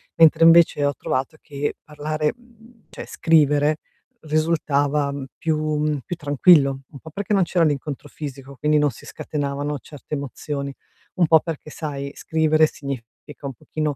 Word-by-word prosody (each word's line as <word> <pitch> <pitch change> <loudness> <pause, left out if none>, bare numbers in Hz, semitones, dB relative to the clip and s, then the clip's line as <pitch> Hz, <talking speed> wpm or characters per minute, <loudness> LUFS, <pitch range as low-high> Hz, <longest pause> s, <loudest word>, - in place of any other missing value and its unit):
Mentre 165 0 +6
invece 165 -3 +6
ho 145 - +1
trovato 135 +6 -3
che 145 -1 -3
parlare 150 0 -2
mhmm, 235 -1 -22
cioè, - - -8
scrivere 150 -1 +3 0.5
risultava 150 -2 +1 0.3
più 160 -1 0 0.2
mhmm, 150 -1 0
più 175 - -4
tranquillo, 145 -2 +4
un 140 - -11
po' 160 - -11
perché 200 +5 -3
non 195 -2 +4
c'era 170 -1 +2
l'incontro 145 -1 -2
fisico, 140 -2 -8
quindi 150 +2 +2
non 145 -1 +2
si - - -14
scatenavano 145 0 -3
certe 145 +2 -11
emozioni, 140 0 -4 0.4
un 180 - +3
po' 160 0 +7
perché 155 -2 -6
sai 140 -3 -5
scrivere 155 -1 +2
significa 140 +1 -9
un 135 - -5
pochino 150 +4 -3
150 Hz, 150 wpm, -22 LUFS, 140-160 Hz, 0.5 s, po